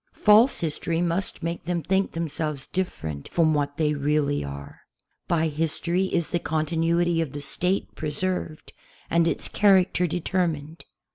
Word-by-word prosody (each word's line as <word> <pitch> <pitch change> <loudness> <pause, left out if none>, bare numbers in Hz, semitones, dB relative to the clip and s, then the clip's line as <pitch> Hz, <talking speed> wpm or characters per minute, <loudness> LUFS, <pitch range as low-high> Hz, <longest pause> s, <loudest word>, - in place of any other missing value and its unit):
False 220 +5 +5
history 165 +1 -1
must 175 +2 -1
make 170 +1 -3
them 170 -1 -1
think 190 +1 0
themselves 155 -3 -3
different 80 - -4
from 160 -2 +2
what 145 -1 -1
they 150 -2 +2
really 145 0 0
are. 70 0 -8 0.5
By 165 -2 +2
history 165 +4 -1
is 170 -3 -1
the 175 - 0
continuity 165 +2 +1
of 155 -5 -3
the 145 - -5
State 180 +7 -1
pre 155 - -4
served 165 0 -3 0.4
and 170 0 +3
its - - -2
character 190 -3 +3
determined. 165 -3 -2
165 Hz, 145 wpm, -25 LUFS, 150-175 Hz, 0.5 s, False